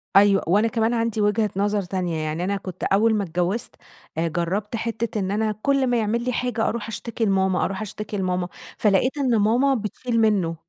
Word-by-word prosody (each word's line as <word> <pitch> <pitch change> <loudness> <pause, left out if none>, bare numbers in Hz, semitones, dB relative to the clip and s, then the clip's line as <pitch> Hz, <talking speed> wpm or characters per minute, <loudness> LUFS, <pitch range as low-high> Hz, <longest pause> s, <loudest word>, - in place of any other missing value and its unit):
أيوه، 200 -1 +6
وأنا 205 +6 +3
كمان 225 0 0
عندي 230 -2 0
وجهة 210 +1 +2
نظر 205 +1 +1
تانية، 180 -2 -2
يعني 155 +2 -2
أنا 200 +2 0
كنت 185 -3 -8
أول 220 +3 +3
ما 205 - 0
اتجوّزت، 180 +5 -2 0.4
جرّبت 175 +6 -1
حتّة 230 -1 -2
إن 190 0 -1
أنا 215 +1 +1
كلّ 275 0 +2
ما 245 -1 +2
يعمل 230 +2 0
لي 250 - -1
حاجة 240 -2 -1
أروح 230 -2 -3
اشتكي 225 +1 -3
لماما، 190 -2 +2
أروح 195 +2 -3
اشتكي 210 0 -5
لماما، 180 -1 -1 0.3
فلقيت 215 +7 +2
إن 255 -5 +2
ماما 245 +7 +3
بتشيل 230 +1 -2
منّه، 195 -7 +2
210 Hz, 185 wpm, -23 LUFS, 190-230 Hz, 0.4 s, أيوه